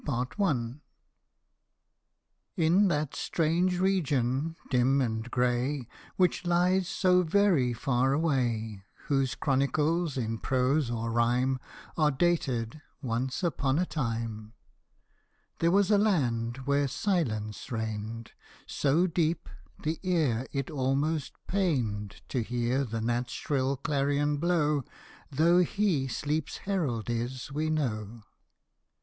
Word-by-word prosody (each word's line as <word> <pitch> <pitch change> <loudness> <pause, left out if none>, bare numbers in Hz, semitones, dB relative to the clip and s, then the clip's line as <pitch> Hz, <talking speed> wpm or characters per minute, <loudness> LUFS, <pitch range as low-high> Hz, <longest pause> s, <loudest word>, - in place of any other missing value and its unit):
TN 130 - -1 2.1
that 150 -3 -1
strange 175 +3 +1
region, 155 -6 +1 0.2
dim 130 +2 +3
and 115 -2 -1
grey, 125 +2 0 0.3
Which 180 -1 +2
lies 180 +1 +2
so 185 -1 +3
very 175 -7 +3
far 130 +1 +1
away, 120 -9 0 0.3
Whose 135 -2 +1
chronicles 150 +3 +1
in 115 -2 -2
prose 130 +1 +1
or 115 -1 -2
rhyme 125 +3 +2 0.4
Are 155 -2 +4
dated 135 -5 0
" - - -43
Once 125 +5 -2
upon 140 -5 +1
a 180 - +2
time," 115 -7 -4 1.1
There 165 - +3
was 200 +3 +3
a 205 - +5
land 130 - 0
where 140 0 +2
silence 130 - -2
reigned 110 0 -4 0.3
So 150 +5 +2
deep, 165 - 0 0.4
the 155 +1 -1
ear 150 - +1
it 140 +2 -3
almost 140 +2 0
pained 120 - -1
To 130 - 0
hear 120 +4 0
the 115 -1 -4
gnat's 120 +1 -1
shrill 135 -1 -1
clarion 145 +1 0
blow, 150 -3 +1 0.5
Though 165 +5 +4
he 180 -6 +1
Sleep's 150 +5 -2
herald 150 - -1
is 120 +3 -3
we 155 +2 -1
know. 115 -7 -2
135 Hz, 110 wpm, -29 LUFS, 120-160 Hz, 2.1 s, a